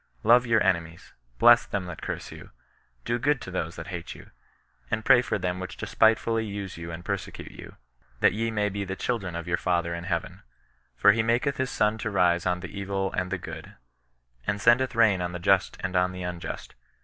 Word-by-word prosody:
Love 120 Hz, +2 st, +5 dB
your 115 Hz, -2 st, +3 dB
enemies, 85 Hz, -1 st, -1 dB, 0.2 s
bless 120 Hz, +1 st, +7 dB
them 100 Hz, -2 st, -3 dB
that 90 Hz, -2 st, -8 dB
curse -, -, -5 dB
you, -, -, -11 dB, 0.6 s
do 120 Hz, +1 st, 0 dB
good 145 Hz, +2 st, +2 dB
to 95 Hz, -, -8 dB
them 85 Hz, -3 st, -2 dB
that 80 Hz, -1 st, -9 dB
hate 85 Hz, -3 st, -6 dB
you, -, -, -14 dB, 0.6 s
and 110 Hz, -, -2 dB
pray 125 Hz, -2 st, +7 dB
for -, -, -2 dB
them 90 Hz, 0 st, -2 dB
which 95 Hz, -1 st, -7 dB
despite 110 Hz, +1 st, +3 dB
fully 115 Hz, -1 st, -1 dB
use 100 Hz, -3 st, -5 dB
you 85 Hz, 0 st, -7 dB
and 85 Hz, +1 st, -8 dB
persecute -, -, -5 dB
you; -, -, -12 dB, 0.4 s
that -, -, +4 dB
ye 115 Hz, +2 st, -1 dB
may 105 Hz, -2 st, 0 dB
be 100 Hz, 0 st, -3 dB
the 95 Hz, 0 st, -4 dB
children 95 Hz, -6 st, -3 dB
of 85 Hz, +1 st, -5 dB
your 85 Hz, 0 st, +1 dB
Father 85 Hz, -1 st, 0 dB
in 85 Hz, +1 st, -5 dB
Heaven. 85 Hz, -3 st, -3 dB, 0.6 s
For 100 Hz, -, +7 dB
he 110 Hz, +2 st, +1 dB
maketh 120 Hz, +5 st, +1 dB
his 130 Hz, -1 st, -1 dB
sun 105 Hz, +1 st, +1 dB
to 115 Hz, -, -2 dB
rise 90 Hz, -3 st, +2 dB
on 90 Hz, 0 st, 0 dB
the 85 Hz, +2 st, -7 dB
evil 95 Hz, -1 st, -2 dB
and 90 Hz, -1 st, -2 dB
the -, -, 0 dB
good, -, -, -9 dB, 0.7 s
and 100 Hz, -, 0 dB
sendeth 120 Hz, +4 st, +3 dB
rain 105 Hz, -5 st, +4 dB
on 90 Hz, 0 st, -3 dB
the -, -, -3 dB
just 95 Hz, +2 st, +2 dB
and 95 Hz, 0 st, -3 dB
on 90 Hz, 0 st, +2 dB
the 90 Hz, 0 st, -6 dB
unjust. 90 Hz, -1 st, -6 dB
95 Hz, 215 wpm, -26 LUFS, 90-115 Hz, 0.7 s, bless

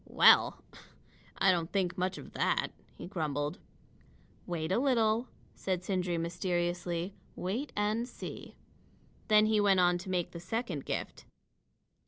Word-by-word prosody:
"Well! -, -, +6 dB, 0.7 s
I 195 Hz, -, +5 dB
don't 170 Hz, -2 st, -1 dB
think 180 Hz, -3 st, 0 dB
much 185 Hz, 0 st, -1 dB
of -, -, -10 dB
that," -, -, +1 dB, 0.3 s
he -, -, -8 dB
grumbled. 150 Hz, -3 st, -2 dB, 0.9 s
"Wait 165 Hz, -2 st, -2 dB
a 195 Hz, -, +3 dB
little," 235 Hz, -3 st, +2 dB, 0.3 s
said 185 Hz, -2 st, -2 dB
Sindri 180 Hz, -2 st, -1 dB
mysteriously. 175 Hz, +1 st, -2 dB, 0.2 s
"Wait 225 Hz, +11 st, -3 dB
and 215 Hz, +3 st, 0 dB
see." -, -, -8 dB, 0.7 s
Then 215 Hz, -1 st, +6 dB
he 215 Hz, -1 st, +3 dB
went 195 Hz, -2 st, +4 dB
on 175 Hz, 0 st, +4 dB
to 190 Hz, +2 st, -8 dB
make 180 Hz, -2 st, -1 dB
the 170 Hz, -, -7 dB
second 185 Hz, -, -3 dB
gift. -, -, -4 dB
185 Hz, 135 wpm, -31 LUFS, 175-210 Hz, 0.9 s, Well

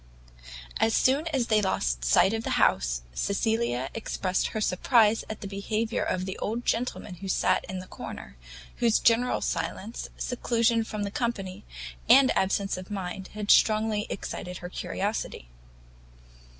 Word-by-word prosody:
As 225 Hz, 0 st, +3 dB
soon 280 Hz, +5 st, +3 dB
as 270 Hz, -7 st, 0 dB
they 215 Hz, -2 st, +3 dB
lost -, -, 0 dB
sight 175 Hz, -, +4 dB
of 225 Hz, 0 st, -2 dB
the -, -, -1 dB
house, -, -, +2 dB
Cecilia 200 Hz, -, 0 dB
expressed 190 Hz, -4 st, -1 dB
her 220 Hz, -, -4 dB
surprise 215 Hz, +2 st, +3 dB
at 220 Hz, -, -6 dB
the 200 Hz, -, -5 dB
behaviour 215 Hz, +3 st, -2 dB
of 185 Hz, 0 st, -1 dB
the 190 Hz, -, -5 dB
old 230 Hz, +3 st, -3 dB
gentleman 225 Hz, -5 st, -2 dB
who 195 Hz, -, -7 dB
sat -, -, +2 dB
in 190 Hz, -, -5 dB
the 185 Hz, -, -6 dB
corner, 65 Hz, -, -9 dB, 0.4 s
whose 230 Hz, -2 st, +3 dB
general 235 Hz, +2 st, +3 dB
silence, 220 Hz, +4 st, -3 dB
seclusion 235 Hz, -2 st, +1 dB
from 215 Hz, -1 st, -4 dB
the 200 Hz, -, -3 dB
company, 200 Hz, -6 st, -3 dB, 0.4 s
and 270 Hz, 0 st, +7 dB
absence 195 Hz, 0 st, +1 dB
of 185 Hz, +2 st, -8 dB
mind, 190 Hz, -2 st, -5 dB
had 210 Hz, -1 st, +1 dB
strongly 215 Hz, -1 st, +3 dB
excited 180 Hz, -2 st, -5 dB
her 180 Hz, -, -7 dB
curiosity. 195 Hz, -, -3 dB
210 Hz, 150 wpm, -27 LUFS, 185-230 Hz, 0.4 s, and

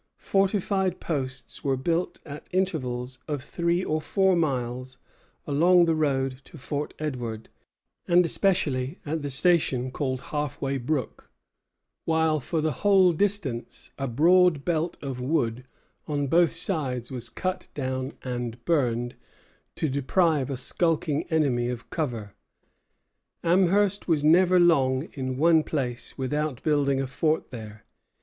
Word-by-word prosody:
Fortified 195 Hz, -1 st, 0 dB
posts 135 Hz, -4 st, -4 dB
were 135 Hz, -2 st, +1 dB
built 165 Hz, +6 st, -1 dB
at 150 Hz, -1 st, -9 dB
intervals 130 Hz, -9 st, -2 dB
of 145 Hz, -4 st, -3 dB
three 170 Hz, +4 st, 0 dB
or 155 Hz, -2 st, -1 dB
four 190 Hz, +2 st, +2 dB
miles 130 Hz, -5 st, -2 dB, 0.5 s
along 170 Hz, +5 st, +4 dB
the 165 Hz, -, +2 dB
road 135 Hz, -4 st, 0 dB
to -, -, -13 dB
Fort 145 Hz, +2 st, -4 dB
Edward, 120 Hz, -7 st, -4 dB, 0.6 s
and 175 Hz, 0 st, +5 dB
especially 165 Hz, -6 st, 0 dB
at 155 Hz, +2 st, -2 dB
the 145 Hz, -, -3 dB
station 135 Hz, -4 st, +2 dB
called 130 Hz, -2 st, -2 dB
Half 150 Hz, -3 st, -4 dB
way 135 Hz, 0 st, -1 dB
Brook; 130 Hz, 0 st, -3 dB, 0.8 s
while, 160 Hz, -1 st, +2 dB
for 155 Hz, +4 st, -2 dB
the 155 Hz, 0 st, +1 dB
whole 190 Hz, -3 st, +5 dB
distance, 170 Hz, -, -2 dB
a 135 Hz, -, -1 dB
broad 160 Hz, +3 st, +4 dB
belt 170 Hz, 0 st, -1 dB
of 130 Hz, -3 st, -4 dB
wood 125 Hz, -4 st, -1 dB, 0.4 s
on 145 Hz, -1 st, -1 dB
both 165 Hz, +3 st, +3 dB
sides 130 Hz, -, +1 dB
was 120 Hz, -2 st, -4 dB
cut 185 Hz, 0 st, -3 dB
down 130 Hz, -1 st, -3 dB
and 120 Hz, -2 st, -5 dB
burned, 120 Hz, -7 st, +1 dB, 0.6 s
to 160 Hz, -, -1 dB
deprive 145 Hz, +1 st, +1 dB
a 135 Hz, -, -3 dB
skulking 155 Hz, +2 st, 0 dB
enemy 130 Hz, -7 st, +1 dB
of 120 Hz, -2 st, -6 dB
cover. 115 Hz, -, -3 dB, 1.1 s
Amherst 195 Hz, +3 st, +2 dB
was 155 Hz, -4 st, +2 dB
never 180 Hz, +4 st, +5 dB
long 135 Hz, -5 st, +3 dB
in 130 Hz, -2 st, -4 dB
one 160 Hz, +2 st, +5 dB
place 125 Hz, -6 st, -4 dB
without 145 Hz, 0 st, -2 dB
building 140 Hz, -3 st, +2 dB
a 135 Hz, -, 0 dB
fort 155 Hz, +4 st, -1 dB
there. 110 Hz, -3 st, -9 dB
145 Hz, 135 wpm, -26 LUFS, 130-170 Hz, 1.1 s, and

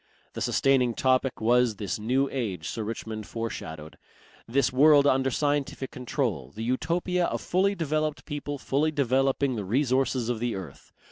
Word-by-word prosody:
The -, -, -6 dB
sustaining 125 Hz, -4 st, +2 dB
topic 130 Hz, 0 st, +1 dB
was 120 Hz, 0 st, +3 dB
this 100 Hz, +1 st, -4 dB
New 130 Hz, +6 st, +1 dB
Age 100 Hz, -11 st, -3 dB
Sir 110 Hz, -, -3 dB
Richmond 110 Hz, -1 st, -5 dB
fore 115 Hz, -1 st, -4 dB
shadowed, 80 Hz, -1 st, -8 dB, 0.5 s
this 130 Hz, +2 st, +1 dB
world 145 Hz, +1 st, +6 dB
under 135 Hz, -1 st, +3 dB
scientific 145 Hz, 0 st, -1 dB
control, 120 Hz, -, -3 dB
the 110 Hz, -, -5 dB
Utopia 170 Hz, +8 st, 0 dB
of -, -, -2 dB
fully 195 Hz, +3 st, +1 dB
developed 155 Hz, -2 st, -1 dB
people 145 Hz, -1 st, -4 dB
fully 140 Hz, +3 st, 0 dB
developing 135 Hz, -1 st, +1 dB
the 105 Hz, -, -3 dB
resources 130 Hz, +2 st, +1 dB
of 120 Hz, -2 st, -1 dB
the 120 Hz, 0 st, -1 dB
earth. 95 Hz, -7 st, -9 dB
130 Hz, 155 wpm, -27 LUFS, 115-145 Hz, 0.5 s, world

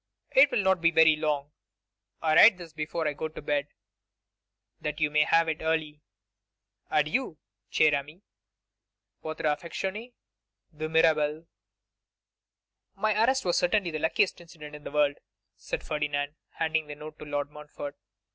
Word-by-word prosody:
It 270 Hz, +2 st, +6 dB
will 245 Hz, -6 st, 0 dB
not 190 Hz, -2 st, +2 dB
be 165 Hz, -, +5 dB
very 160 Hz, -1 st, +5 dB
long. 150 Hz, -2 st, -2 dB, 0.7 s
I 155 Hz, -1 st, +2 dB
write 210 Hz, +4 st, +8 dB
this 170 Hz, -3 st, -11 dB
before 160 Hz, +1 st, -3 dB
I 150 Hz, -, -1 dB
go 155 Hz, -, -4 dB
to 155 Hz, -, -10 dB
bed, 145 Hz, -1 st, -1 dB, 1.1 s
that 150 Hz, 0 st, -4 dB
you 150 Hz, -1 st, +1 dB
may 150 Hz, 0 st, +4 dB
have 165 Hz, 0 st, +3 dB
it 160 Hz, -1 st, -2 dB
early. 160 Hz, -2 st, -1 dB, 0.9 s
Adieu, 155 Hz, -, 0 dB, 0.3 s
cher 155 Hz, -1 st, +4 dB
ami. 150 Hz, +7 st, -4 dB, 1.0 s
'Votre 155 Hz, 0 st, -6 dB
affectionné, 190 Hz, +9 st, -3 dB, 0.6 s
'De 155 Hz, +1 st, -4 dB
Mirabel. 160 Hz, -1 st, +2 dB, 1.5 s
'My 215 Hz, 0 st, +1 dB
arrest 260 Hz, 0 st, +2 dB
was 175 Hz, -, +2 dB
certainly 180 Hz, 0 st, +1 dB
the 155 Hz, -, -3 dB
luckiest 165 Hz, +4 st, +1 dB
incident 150 Hz, -3 st, -11 dB
in 150 Hz, -, -12 dB
the -, -, -6 dB
world,' 145 Hz, -1 st, +1 dB, 0.4 s
said -, -, -5 dB
Ferdinand, 145 Hz, -1 st, -2 dB, 0.2 s
handing 160 Hz, -1 st, -1 dB
the 145 Hz, -, -7 dB
note 155 Hz, +1 st, -10 dB
to -, -, -8 dB
Lord 145 Hz, -1 st, -3 dB
Montfort. 150 Hz, -1 st, -8 dB
155 Hz, 145 wpm, -28 LUFS, 150-170 Hz, 1.5 s, write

